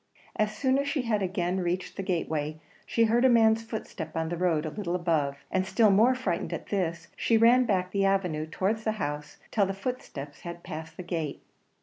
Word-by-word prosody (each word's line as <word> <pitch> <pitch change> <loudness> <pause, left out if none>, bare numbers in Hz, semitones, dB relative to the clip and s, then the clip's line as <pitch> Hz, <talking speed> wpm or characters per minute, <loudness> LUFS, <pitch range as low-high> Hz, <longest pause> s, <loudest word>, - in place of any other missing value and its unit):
As 215 0 0
soon 265 +1 +2
as 280 - -1
she 280 -2 0
had 215 -3 0
again 185 -1 -1
reached 180 +1 -2
the - - -3
gateway 155 -4 -2 0.3
she 230 - +2
heard 230 +2 +3
a 260 - +6
man's 225 -2 +5
footstep 190 -8 -6
on 160 0 -1
the 175 - -2
road 170 -3 +1
a 155 - -3
little 180 -3 -3
above; 160 -6 0
and 190 - +2
still 200 +3 +4
more 225 +6 +5
frightened 195 -10 -2
at - - -6
this, 175 -4 -2
she 230 - +2
ran 240 +3 +6
back 185 -4 0
the 200 0 +1
avenue 180 -6 +1
towards 205 +7 -1
the 220 - +1
house 150 -7 -4
till 200 -3 +2
the 195 - -3
footsteps 175 - -6
had 170 0 -7
passed 160 -1 -7
the 180 - -5
gate. 165 -5 -3
190 Hz, 210 wpm, -28 LUFS, 165-220 Hz, 0.3 s, a